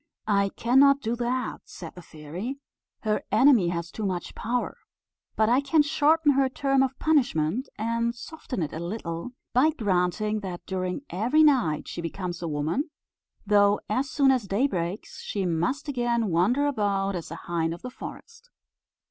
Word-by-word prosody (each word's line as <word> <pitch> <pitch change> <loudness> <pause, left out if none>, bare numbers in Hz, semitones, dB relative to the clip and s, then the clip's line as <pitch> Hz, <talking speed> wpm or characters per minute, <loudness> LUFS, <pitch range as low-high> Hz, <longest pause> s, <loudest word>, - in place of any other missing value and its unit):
"I 200 -2 +2
cannot 275 +4 +5
do 230 -1 -1
that," 245 +1 -2
said 165 -3 -9
the 180 - -11
fairy; 170 - -7 0.4
"her 215 -1 0
enemy 225 -3 +5
has 170 0 -3
too 220 - -6
much 185 -3 -3
power; 245 +2 -2 0.6
but 220 - +3
I 245 +4 +4
can 295 +2 +3
shorten 310 +1 +3
her 270 -1 +2
term 275 0 +1
of 265 0 0
punishment, 250 - +1
and 230 +2 -1
soften 250 - -5
it 150 - -5
a 160 - -4
little, 170 +3 -5 0.2
by 255 +6 +5
granting 210 - 0
that 185 -4 -7
during 185 +3 -3
every 245 - +3
night 245 - +3
she 170 - -5
becomes 175 +1 -5
a 170 - -3
woman, 155 - -1 0.6
though 205 0 +4
as 260 +5 0
soon 275 -1 +4
as 250 -6 0
day 205 +8 +1
breaks 180 -5 -3
she 200 -2 -3
must 180 - -1
again 240 -5 0
wander 200 +12 +2
about 200 -7 0
as 170 - -5
a 165 - -6
hind 165 -1 -2
of 170 - -7
the 250 - -6
forest." 465 - -10
220 Hz, 165 wpm, -26 LUFS, 180-265 Hz, 0.6 s, cannot